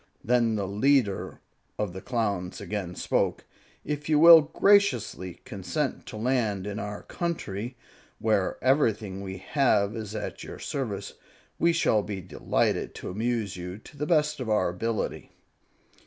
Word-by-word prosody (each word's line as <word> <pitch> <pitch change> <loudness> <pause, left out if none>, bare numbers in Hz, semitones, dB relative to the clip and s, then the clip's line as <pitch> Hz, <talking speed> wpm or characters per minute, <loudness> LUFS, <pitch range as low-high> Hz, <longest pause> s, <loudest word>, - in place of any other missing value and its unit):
Then 115 -1 +2
the 100 -2 -1
leader 105 0 +1 0.4
of 105 -4 -2
the 95 - -7
Clowns 100 -7 -2
again 95 -4 -4
spoke, - - 0 0.4
"If 150 0 -3
you 155 - +4
will 165 +1 +10
graciously 130 - +2
consent 95 -8 -3
to - - -7
land 110 -5 0
in 105 +1 -4
our 105 -1 -5
country, 125 - -4 0.4
where 110 -4 +1
everything 110 -8 +1
we 95 -1 -6
have 105 -3 +1
is 110 -1 -6
at 105 - -5
your - - -8
service, - - -4 0.5
we 170 - +4
shall 140 -10 +2
be 100 -1 -5
delighted 90 -2 -1
to - - -6
amuse 110 -1 -1
you 90 +1 -6
to 110 - -15
the 150 +1 -3
best 150 -3 +2
of 125 -4 -4
our 105 -4 +2
ability." 110 +5 -3
110 Hz, 145 wpm, -27 LUFS, 100-135 Hz, 0.5 s, will